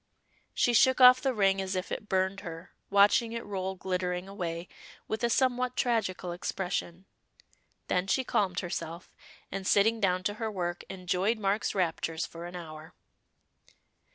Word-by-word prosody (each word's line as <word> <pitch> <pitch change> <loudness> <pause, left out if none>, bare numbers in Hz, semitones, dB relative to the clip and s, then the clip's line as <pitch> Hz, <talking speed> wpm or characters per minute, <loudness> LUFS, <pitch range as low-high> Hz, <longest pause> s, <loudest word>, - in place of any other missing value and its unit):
She 245 - +3
shook 260 +3 +5
off 255 0 +9
the 270 - +1
ring 195 -4 +2
as 190 0 -3
if 185 +1 -3
it 210 - -5
burned 190 +1 +1
her, 165 0 -9 0.2
watching 205 +3 +4
it 230 - -5
roll 190 -1 -3
glittering 180 -1 -2
away, 175 -3 -5 0.4
with 220 +2 -3
a 235 - +3
somewhat 250 0 +1
tragical 195 -7 0
expression. 180 0 -4 0.8
Then 180 +1 0
she 260 +6 +1
calmed 190 -7 0
herself, 170 -1 -5 0.4
and 195 0 -4
sitting 225 +3 +4
down 185 -3 +1
to 205 - 0
her 220 - -1
work, 175 -4 -3
enjoyed 185 +4 0
Mark's 205 0 0
raptures 165 -3 -1
for 170 +1 -8
an 175 - -9
hour. 160 -1 -9
190 Hz, 155 wpm, -29 LUFS, 180-215 Hz, 0.8 s, off